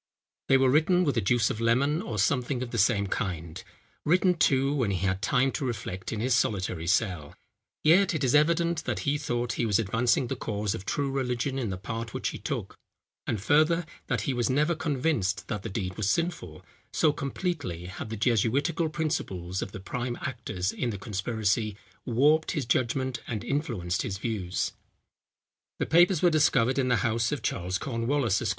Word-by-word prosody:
They 135 - +6
were 130 -1 +4
written 170 +5 +4
with 145 -5 +1
the 115 - +1
juice 115 +3 +2
of 115 - -5
lemon, 140 +8 +2
or 110 - -5
something 125 +4 +1
of 120 - -7
the 115 - -1
same 100 0 +3
kind: 85 -2 -4 0.4
written, 180 +3 +3
too, 135 -4 +2
when 130 -7 0
he 95 -1 -1
had 95 0 0
time 125 +6 +2
to - - -4
reflect 95 -7 -4
in 110 - -3
his 125 +3 +1
solitary 95 -7 0
cell, 90 -6 0 0.5
yet 175 +3 +5
it 150 - -1
is 130 - +2
evident 165 +2 +2
that - - -2
he 145 +1 0
thought 120 -4 -2
he - - +1
was 105 - +3
advancing 115 +4 +1
the - - -3
cause 105 -2 -2
of 95 - -6
true 140 +4 -1
religion 130 0 -1
in 120 -5 -2
the 95 - -3
part 115 +3 -5
which - - -1
he - - -7
took; - - -5 0.5
and, 105 -3 -2
further, 155 +5 +3 0.2
that 125 -5 0
he 130 - -1
was 120 0 0
never 150 +6 +2
convinced 135 - -1
that 105 -3 -2
the - - -5
deed 95 -2 -3
was 105 -2 0
sinful, 160 - -2 0.3
so 155 -2 +3
completely 140 - -3
had 95 +4 -7
the 110 - -4
jesuitical 130 - +1
principles 95 - -2
of 95 - -5
the - - -7
prime 120 +5 -4
actors 110 -8 -3
in 125 - -2
the 105 - -4
conspiracy 105 +1 -1 0.3
warped 145 +6 +3
his 145 -7 -2
judgment 125 +1 0
and 110 -4 -3
influenced 115 - -1
his 105 -7 -3
views. 100 -5 -2 1.1
The - - -1
papers 175 +1 +4
were 175 - +6
discovered 135 -4 +3
in 130 - +1
the 120 -5 +2
house 115 +1 +1
of 145 -6 -3
Charles 90 +1 -1
Cornwallis, 120 -2 0
Esq. - - -1
120 Hz, 190 wpm, -28 LUFS, 100-145 Hz, 1.1 s, They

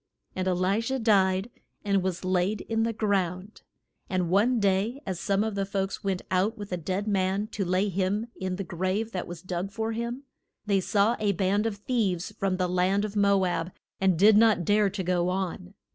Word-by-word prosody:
And 185 0 -2
E - - +3
li 185 +4 +1
sha 265 +3 -2
died, 195 -2 +2 0.3
and 200 -1 +2
was 185 -1 -3
laid 185 +3 +1
in 225 0 -1
the 230 +1 +1
ground. 200 -2 -2 0.5
And 180 -2 -1
one 225 +6 +3
day 200 +5 +1
as 185 -3 -3
some 200 +1 +1
of 220 -1 -2
the 200 0 -1
folks 195 0 -3
went 190 -2 -1
out 195 +5 +1
with 205 -2 -8
a - - 0
dead 185 +5 -3
man 195 0 +1
to 205 - -3
lay 185 +3 +1
him 195 +3 -1
in 185 -1 -3
the 195 - -4
grave 185 +6 -2
that 180 -4 -4
was 175 0 -8
dug 185 +1 -3
for 220 +2 -3
him, 235 +4 -4 0.4
they 200 -2 +2
saw 210 +4 +2
a 205 -2 +1
band 195 +4 +1
of 220 - -3
thieves 205 -5 -1
from 195 -1 0
the 185 -1 0
land 185 +3 +1
of 210 0 -6
Mo 200 -2 +3
ab 175 -1 -2 0.3
and 190 -3 +2
did 210 +4 +6
not 215 -5 +4
dare 205 +1 +3
to 195 0 -4
go 180 0 +1
on. 185 0 -4
195 Hz, 205 wpm, -27 LUFS, 185-210 Hz, 0.5 s, did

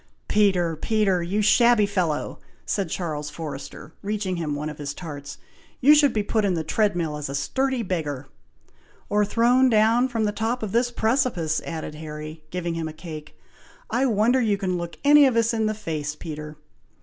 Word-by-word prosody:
"Peter! 185 -6 +2
Peter! 195 +1 +1
you 195 +5 -1
shabby 235 0 +5
fellow!" 180 -7 -2 0.3
said 195 -5 -1
Charles 155 -4 -3
Forrester, 150 0 -8
reaching 200 -3 -2
him 155 -3 -2
one 150 +1 -4
of 150 -1 -7
his 145 0 -4
tarts, 145 -4 -8 0.4
"you 290 +4 +7
should 295 -3 +5
be 215 -2 -1
put 215 +1 0
in 195 -3 +1
the 160 - -2
tread 205 +5 +1
mill 160 -4 -2
as 145 -2 -5
a 140 - -4
sturdy 260 - -1
beggar!" 150 -8 -3 0.8
"Or 210 0 +3
thrown 240 +5 +3
down 225 +3 +4
from 230 -3 -2
the 210 - +1
top 225 +3 -2
of 210 - -3
this 240 +3 +2
precipice," 225 - 0
added 160 -2 -5
Harry, 155 0 -8
giving 175 0 -3
him 165 -1 -3
a 155 - -7
cake. 155 -2 -9 0.5
"I 265 +2 +2
wonder 235 +3 +3
you 210 -4 +1
can 190 -2 -1
look 170 -1 -5
any 290 0 +7
of 255 - 0
us 230 0 +2
in 220 -1 +1
the 215 - -1
face, 155 -7 -4
Peter!" 150 -1 -7
190 Hz, 185 wpm, -24 LUFS, 155-225 Hz, 0.8 s, you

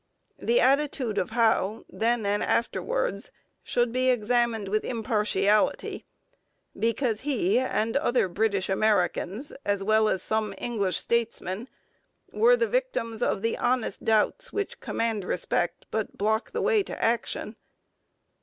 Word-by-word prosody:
The 480 +1 +2
attitude 275 - +2
of 180 - -2
Howe, 220 -2 +1
then 230 -1 0
and 205 +1 +1
afterwards, - - -1 0.3
should 240 -1 0
be 255 +1 +1
examined 235 -2 +1
with 215 +2 0
impartiality, 210 -3 0 0.7
because 230 -1 0
he 245 -6 +1
and 225 -3 -1
other 255 -7 +2
British 200 +1 0
Americans, 200 - 0
as 200 -1 0
well 215 +1 +3
as 190 -3 0
some 215 -2 -1
English 200 -7 -1
statesmen, 230 -2 -1 0.6
were 485 +2 +4
the 480 - +2
victims 470 - -2
of 200 - 0
the 230 - +1
honest 250 -2 0
doubts 225 - +1
which 410 -1 -3
command 225 -3 -2
respect 175 -1 -2
but 220 -1 -3
block 220 +2 0
the - - -3
way 435 -2 +3
to - - -6
action. 230 +1 -1
225 Hz, 130 wpm, -27 LUFS, 210-250 Hz, 0.7 s, were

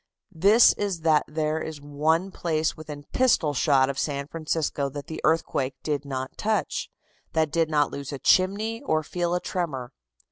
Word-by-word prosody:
This 200 +8 +6
is 195 -5 -2
that 155 -2 +4
there 155 +1 -1
is 155 -2 -6
one 155 +6 0
place 160 -3 -1
within 150 -2 -9
pistol 225 - +3
shot 135 -1 +3
of 135 0 -3
San 140 -2 -2
Francisco 155 -3 -2
that 145 +1 -7
the 160 - -7
earthquake 150 -4 +1
did 145 -2 -2
not 130 -1 -5
touch, 215 0 -1 0.4
that 160 -2 +1
did 165 0 +1
not 150 -2 +2
lose 140 0 -6
a 140 - -4
chimney 200 - +2
or 155 0 0
feel 175 +2 -1
a - - +1
tremor. 145 -10 -4
155 Hz, 170 wpm, -25 LUFS, 145-170 Hz, 0.4 s, This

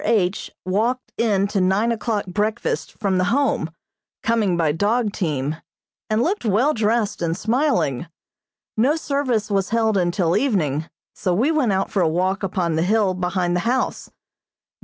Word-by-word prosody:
H. 200 -4 +1 0.2
walked 225 +7 0
in 205 -4 +2
to 200 -2 0
nine 195 +5 +2
o'clock 225 -2 -1
breakfast 210 +5 -2
from 195 -3 0
the 185 - +2
Home, 265 - +1 0.5
coming 220 -6 +1
by 160 -3 +2
dog 210 +6 0
team, 150 -3 -2 0.5
and 215 +2 +2
looked 390 +5 -1
well 230 +8 +2
dressed 215 -2 0
and 165 0 -1
smiling. 200 - 0 0.7
No 260 +8 +3
service 275 -9 -1
was 195 -2 +1
held 220 -2 +2
until 175 -1 +1
evening, 160 - 0 0.2
so 180 -2 -1
we 255 - +2
went 290 -9 +2
out 190 0 0
for 195 - +1
a 165 - +3
walk 185 +4 0
upon 180 -4 -1
the - - +2
hill 200 +1 +2
behind 180 -1 -1
the - - +2
house. 255 +1 -1
200 Hz, 160 wpm, -22 LUFS, 180-230 Hz, 0.7 s, No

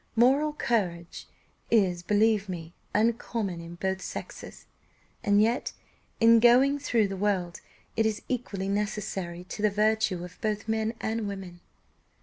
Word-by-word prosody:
Moral 275 +6 +4
courage 180 - -2 0.4
is, 190 -6 +3
believe 210 +1 +2
me, 170 -2 -6 0.2
uncommon 220 -4 0
in 170 +1 -9
both 190 +1 -2
sexes, - - -8 0.6
and 205 0 +4
yet 230 +4 +1 0.5
in 230 0 +7
going 255 +5 +5
through 230 -6 +1
the 195 - -5
world 185 -3 -1 0.3
it 225 -1 +3
is 215 -1 -3
equally 205 -6 -3
necessary 195 -4 -3
to 185 - -7
the 210 - +4
virtue 210 -3 +1
of 180 0 -11
both 215 0 -2
men 220 +1 -1
and 220 -1 -2
women." 190 -3 -7
210 Hz, 135 wpm, -28 LUFS, 185-225 Hz, 0.6 s, in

